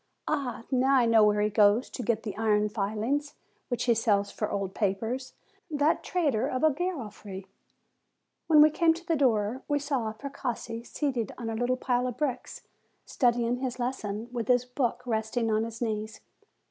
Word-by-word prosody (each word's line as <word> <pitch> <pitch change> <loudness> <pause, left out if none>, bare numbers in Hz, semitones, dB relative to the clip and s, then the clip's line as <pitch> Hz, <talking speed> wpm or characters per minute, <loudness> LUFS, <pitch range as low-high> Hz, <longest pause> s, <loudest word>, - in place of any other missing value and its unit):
Ah! 275 -6 -2
now 265 +1 +3
I 250 -2 +5
know 225 -2 +5
where 210 0 +3
he 210 0 +1
goes 210 +3 +4
to - - -5
get 230 -1 0
the 210 - -5
iron 210 -1 +2
filings, 220 +8 -2 0.3
which 245 -2 -2
he 240 - +4
sells 205 -3 +1
for 210 - -3
old 195 -1 -3
papers, 225 +6 -2 0.4
that 295 0 +1
trader 295 - 0
of 255 +3 -2
a 315 - +6
Garofri! 220 - -5 1.0
When 305 -2 +7
we 305 - +5
came 325 +1 +3
to 340 +1 -11
the 335 -2 +1
door, 240 -3 +1
we 290 - +1
saw 275 -6 -1
Precossi 245 -2 -5
seated 250 -5 -2
on 230 -2 -4
a - - -3
little 245 +2 0
pile 250 0 0
of 250 -1 -5
bricks, 260 -5 -3 0.4
studying 240 -1 +1
his 250 -1 -3
lesson, 235 -3 -3
with 235 -3 -3
his 250 -1 +3
book 250 -1 -2
resting 225 0 -1
on 215 +1 +1
his 230 +1 -5
knees. 215 -1 -3
240 Hz, 175 wpm, -28 LUFS, 215-265 Hz, 1.0 s, When